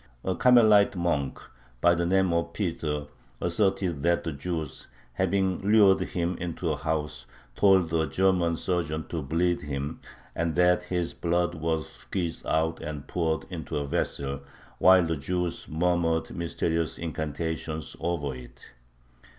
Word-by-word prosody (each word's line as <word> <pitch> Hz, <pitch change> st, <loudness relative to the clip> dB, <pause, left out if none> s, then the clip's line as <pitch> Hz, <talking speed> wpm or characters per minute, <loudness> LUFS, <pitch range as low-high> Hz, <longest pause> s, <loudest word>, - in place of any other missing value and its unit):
A 95 Hz, -, 0 dB
Carmelite 110 Hz, -4 st, +5 dB
monk 85 Hz, -6 st, -1 dB, 0.4 s
by 85 Hz, +7 st, +5 dB
the 85 Hz, 0 st, 0 dB
name 95 Hz, -1 st, +3 dB
of 85 Hz, 0 st, -1 dB
Peter 80 Hz, -6 st, -2 dB, 0.3 s
asserted 95 Hz, -3 st, 0 dB
that 85 Hz, +2 st, +2 dB
the 80 Hz, -, -2 dB
Jews, 80 Hz, 0 st, -5 dB, 0.3 s
having 95 Hz, +6 st, +1 dB
lured 100 Hz, -1 st, +5 dB
him 85 Hz, 0 st, -2 dB
into 85 Hz, -1 st, -2 dB
a -, -, 0 dB
house, 75 Hz, 0 st, -3 dB, 0.3 s
told 95 Hz, -3 st, +4 dB
a 80 Hz, -1 st, +2 dB
German 90 Hz, +1 st, +2 dB
surgeon 80 Hz, -4 st, -2 dB
to 80 Hz, -, -3 dB
bleed 85 Hz, +5 st, 0 dB
him, 70 Hz, +2 st, -4 dB, 0.3 s
and 85 Hz, +2 st, -1 dB
that 90 Hz, 0 st, +4 dB
his 90 Hz, -1 st, -2 dB
blood 85 Hz, +1 st, 0 dB
was 80 Hz, -1 st, -2 dB
squeezed 85 Hz, -4 st, -5 dB
out 80 Hz, +1 st, +1 dB
and 75 Hz, -2 st, -6 dB
poured 80 Hz, -2 st, -1 dB
into 80 Hz, -6 st, -4 dB
a 75 Hz, -, -1 dB
vessel, 70 Hz, 0 st, -2 dB, 0.4 s
while 95 Hz, -1 st, +6 dB
the 80 Hz, 0 st, -1 dB
Jews 90 Hz, +4 st, -3 dB
murmured 80 Hz, 0 st, +1 dB
mysterious 85 Hz, -1 st, -1 dB
incantations 80 Hz, 0 st, -4 dB
over 80 Hz, -5 st, -2 dB
it. 60 Hz, -1 st, -13 dB
85 Hz, 140 wpm, -27 LUFS, 80-90 Hz, 0.4 s, while